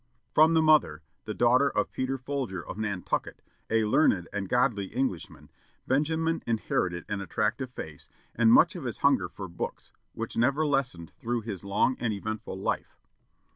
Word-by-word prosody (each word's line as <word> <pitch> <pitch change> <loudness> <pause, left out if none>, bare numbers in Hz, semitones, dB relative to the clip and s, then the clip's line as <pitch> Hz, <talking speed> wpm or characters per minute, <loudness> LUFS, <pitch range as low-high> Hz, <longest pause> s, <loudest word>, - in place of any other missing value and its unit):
From 160 +1 +6
the 160 - +4
mother, 145 - +4 0.2
the 110 - -4
daughter 125 +4 +4
of - - -1
Peter 130 +1 -2
Folger 130 - -4
of - - -6
Nantucket, 100 -4 -2 0.3
"a 110 -1 +2
learned 105 - +3
and 100 -2 -3
godly 125 -5 +2
Englishman," 120 -5 -4 0.3
Benjamin 160 +4 +1
inherited 90 -6 -1
an 105 -1 -3
attractive 110 +6 -1
face, 80 - -8 0.2
and 115 -1 +4
much 170 +9 +6
of 170 -7 -6
his 120 - -3
hunger 140 -1 +3
for 95 - -7
books, 85 0 -6 0.2
which - - -5
never 140 +6 +2
lessened 130 - -1
through 120 0 -1
his 105 -4 -6
long 100 +6 +1
and 120 -2 0
eventful 105 -1 -5
life. - - -3
115 Hz, 160 wpm, -28 LUFS, 100-135 Hz, 0.3 s, From